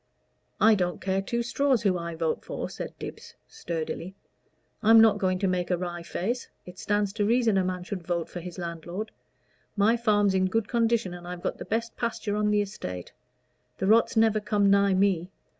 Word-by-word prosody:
"I 220 +1 +6
don't 180 -4 0
care 190 0 0
two 235 +4 -2
straws 255 0 +1
who 195 -3 +3
I 170 -1 -4
vote 160 -1 -1
for," - - -5
said - - -7
Dibbs, - - -9
sturdily. 170 +2 -5 0.7
"I'm 225 +1 +7
not 220 -2 +5
going 185 -2 +1
to 195 - 0
make 180 -1 -1
a 180 - +1
wry 175 -1 -4
face. 225 +8 -3 0.2
It 180 +1 -11
stands 205 -1 0
to 210 -1 -1
reason 230 0 +3
a 190 - +3
man 180 -1 -3
should 190 0 -5
vote 170 -1 -2
for 180 - -7
his 175 +1 -8
landlord. 175 +4 -5 0.7
My 210 +3 +4
farm's 205 -4 +2
in 185 0 +2
good 220 +2 0
condition, 230 -5 +1
and 175 0 -9
I've 180 0 -7
got - - -3
the - - -6
best 230 +1 -2
pasture 225 -3 -2
on 210 0 +1
the 210 0 +3
estate. 90 - -7 0.7
The - - -2
rot's 225 +3 +4
never 220 -1 +4
come 205 -1 +2
nigh 200 -1 +4
me. 185 -2 +2
195 Hz, 195 wpm, -27 LUFS, 180-220 Hz, 0.7 s, I'm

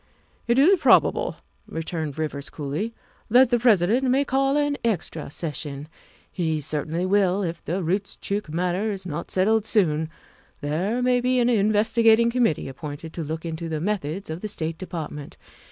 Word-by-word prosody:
' - - -37
' - - -37
"It 235 +1 +3
is 340 +7 +5
probable," - - +4 0.3
returned 160 -3 -4
Rivers 145 -3 -3
coolly, 155 +11 -4 0.2
" - - -34
that 250 +2 +6
the 240 - +3
President 225 +1 +3
may 270 +3 +3
call 270 +1 +1
an 290 -1 +1
extra 175 -8 -2
session. 145 -2 -5 0.4
He 160 -4 -1
certainly 155 +4 -2
will 195 0 +2
if 170 -2 -4
the 180 +3 -2
Roostchook 200 +1 -2
matter 180 +5 0
is 195 -3 -5
not 150 -4 -5
settled 215 +3 +2
soon. 160 -7 +2 0.5
There 185 +12 -1
may 250 0 +3
be 255 +1 +1
an 245 0 +3
investigating 225 +1 +4
committee 235 -10 +1
appointed 145 +3 -7
to 170 - -4
look 160 +2 -5
into 165 0 -4
the 155 -1 -2
methods 185 -1 -3
of 160 +3 -5
the 215 - -3
State 160 -5 -4
Department. 155 -5 -6
185 Hz, 170 wpm, -24 LUFS, 160-225 Hz, 0.5 s, that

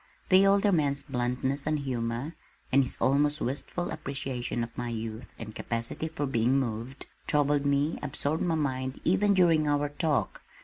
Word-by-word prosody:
The 190 0 +6
older 200 +1 +4
man's 140 -5 +1
bluntness 130 +1 -2
and 155 0 +2
humor, 125 +1 -3 0.4
and 135 - +6
his 125 - -2
almost 145 +3 +2
wistful 145 +7 -3
appreciation 125 -3 -3
of 115 - -7
my 120 -1 -3
youth 115 +1 -5
and 110 - -7
capacity 115 +9 -3
for 150 -2 -3
being 125 0 +2
moved, 120 +1 -4 0.2
troubled 145 -1 +2
me, 140 +3 +1
absorbed 150 +2 -2
my 170 -2 +1
mind 130 -3 -2
even 200 +3 +3
during 165 -4 +4
our 145 0 +1
talk. 145 0 -1
140 Hz, 160 wpm, -29 LUFS, 125-155 Hz, 0.4 s, The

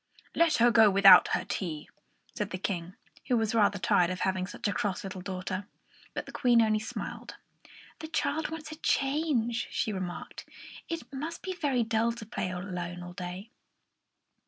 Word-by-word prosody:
"Let 335 -1 +3
her 235 +1 +5
go 225 -2 +7
without 195 0 +8
her - - -1
tea," 160 -6 -4 0.5
said 205 -1 -3
the 185 - -4
King, 180 -2 -4 0.3
who 245 - +3
was 220 -1 0
rather 205 -2 +3
tired 175 -1 +3
of 185 0 -4
having 185 -1 0
such 205 - -4
a 205 - 0
cross 200 -3 -2
little 190 -1 -6
daughter. 185 +1 -4 0.5
But - - -3
the - - -10
Queen 245 -3 +3
only 215 -1 +3
smiled. 220 - -6 0.6
"The 315 - -6
child 305 0 -1
wants 315 -1 -7
a 310 - -8
change," 270 -6 0
she 220 - -1
remarked. 185 -2 -6 0.4
"It 330 -3 -5
must 310 +5 -5
be 375 - -3
very 285 -9 0
dull 225 +1 +1
to 230 -2 -9
play 215 -4 -3
alone 180 -1 -5
all 175 0 -9
day." 180 +4 -7
215 Hz, 175 wpm, -29 LUFS, 185-250 Hz, 0.6 s, without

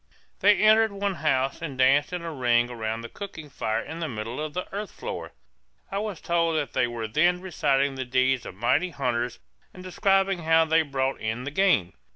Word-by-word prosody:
They 205 0 +5
entered 215 +2 +5
one 200 0 -2
house 135 -5 0
and 145 -6 -5
danced 135 +6 +4
in 180 -1 -4
a 165 -1 -5
ring 120 -2 +2
around 110 -1 -3
the 115 - -7
cooking 160 - -9
fire 110 -2 -1
in 160 +7 -7
the 165 -2 -3
middle 115 +3 -5
of 155 0 -5
the 180 - -2
earth 205 +1 -4
floor; - - -6 0.6
I 195 - -1
was 210 -4 -4
told 170 -1 +1
that 145 -5 -2
they - - +2
were 115 -2 -4
then 175 +10 +2
reciting 140 -6 +1
the 130 -1 -4
deeds 130 -1 +1
of - - -9
mighty 120 - +1
hunters 125 -5 -2 0.4
and 180 - -10
describing 195 0 +1
how 160 0 +4
they 160 +1 +3
brought 135 -3 -2
in 110 +3 -3
the 140 - -5
game. 150 - +2
150 Hz, 200 wpm, -26 LUFS, 125-180 Hz, 0.6 s, They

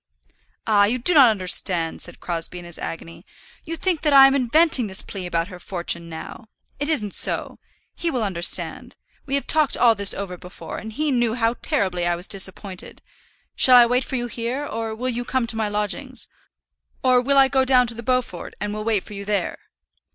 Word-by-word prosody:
"Ah! 205 -2 +4
you 230 +5 0
do 255 +9 +3
not 275 -6 +7
understand," 185 -4 +1
said - - -8
Crosbie 170 0 -4
in 175 - -9
his 175 -1 -6
agony. 165 0 -7 0.4
"You 330 +1 -4
think 345 -2 -1
that 300 -2 +1
I 270 -1 +9
am 270 - +4
inventing 275 -1 +3
this 190 -1 +1
plea 190 -3 -7
about 170 +1 -2
her 180 -2 -10
fortune 170 -2 -3
now. 165 +7 -9 0.3
It 290 +1 -2
isn't 210 -11 0
so. - - -1 0.3
He 340 - -3
will 250 -7 -2
understand. 185 -3 -1 0.3
We 275 - -1
have 280 - -1
talked 310 -3 +2
all 235 -2 +5
this 200 -2 +1
over 190 -2 -6
before, 180 +1 -9
and 220 - -8
he 300 +6 -1
knew 240 -3 +1
how 230 -1 +1
terribly 185 - 0
I 175 - +1
was 175 +2 -6
disappointed. 190 -1 -1 0.5
Shall 255 -1 +7
I 240 - +8
wait 250 +2 +1
for 265 - -5
you 240 -1 -2
here, 240 +4 -4
or 225 -4 -5
will 250 +3 -4
you 245 0 -3
come 255 0 -1
to 230 - -5
my 220 -1 -1
lodgings? 220 +5 -2 0.8
Or 255 -1 +4
I - - +5
will 270 +1 +3
go 265 -1 +2
down 255 -1 +4
to 235 - -1
the 230 - -8
Beaufort, 245 -7 -3
and 210 +1 -3
will 215 0 -5
wait 215 -3 0
for 210 - -12
you 200 0 -7
there." 200 -3 -2
225 Hz, 210 wpm, -22 LUFS, 190-260 Hz, 0.8 s, I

